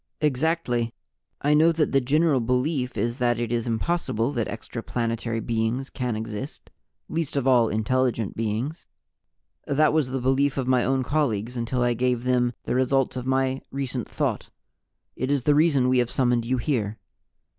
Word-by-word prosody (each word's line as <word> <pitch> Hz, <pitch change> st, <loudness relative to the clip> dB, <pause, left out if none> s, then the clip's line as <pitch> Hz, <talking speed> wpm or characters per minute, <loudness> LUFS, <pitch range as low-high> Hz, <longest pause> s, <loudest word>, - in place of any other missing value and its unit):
"Exactly. 135 Hz, -5 st, 0 dB, 0.5 s
I 145 Hz, +1 st, +3 dB
know 160 Hz, +3 st, +5 dB
that 160 Hz, -2 st, 0 dB
the 135 Hz, -, +3 dB
general 150 Hz, +2 st, +2 dB
belief 125 Hz, +1 st, -1 dB
is 120 Hz, +5 st, -1 dB
that 120 Hz, -1 st, +2 dB
it 120 Hz, -1 st, -2 dB
is 120 Hz, 0 st, -1 dB
impossible 115 Hz, -1 st, 0 dB
that 120 Hz, -6 st, -1 dB
extraplanetary 115 Hz, 0 st, -3 dB
beings 115 Hz, +4 st, -1 dB
can 125 Hz, -3 st, -2 dB
exist, 110 Hz, +5 st, -6 dB, 0.4 s
least 160 Hz, -3 st, -2 dB
of 135 Hz, -, 0 dB
all 125 Hz, -3 st, +5 dB
intelligent 115 Hz, 0 st, 0 dB
beings. 115 Hz, +8 st, -3 dB, 0.8 s
That 150 Hz, +2 st, +3 dB
was 155 Hz, -5 st, +2 dB
the 130 Hz, +1 st, -2 dB
belief 135 Hz, +3 st, +1 dB
of 130 Hz, -2 st, -1 dB
my 130 Hz, -2 st, +3 dB
own 130 Hz, 0 st, +1 dB
colleagues 125 Hz, -5 st, -1 dB
until 120 Hz, +1 st, -1 dB
I 120 Hz, 0 st, +2 dB
gave 125 Hz, 0 st, 0 dB
them 125 Hz, -1 st, +2 dB
the -, -, -2 dB
results 130 Hz, +1 st, +1 dB
of 125 Hz, 0 st, -4 dB
my 130 Hz, 0 st, +1 dB
recent 130 Hz, -3 st, -4 dB
Thought. -, -, -2 dB, 0.7 s
It 130 Hz, -, -2 dB
is 140 Hz, -3 st, +1 dB
the 150 Hz, -, +4 dB
reason 145 Hz, -4 st, +3 dB
We 130 Hz, 0 st, +3 dB
have 120 Hz, -1 st, +1 dB
summoned 120 Hz, -3 st, +1 dB
you 130 Hz, +2 st, 0 dB
here. 115 Hz, -6 st, -1 dB
125 Hz, 165 wpm, -25 LUFS, 120-140 Hz, 0.8 s, know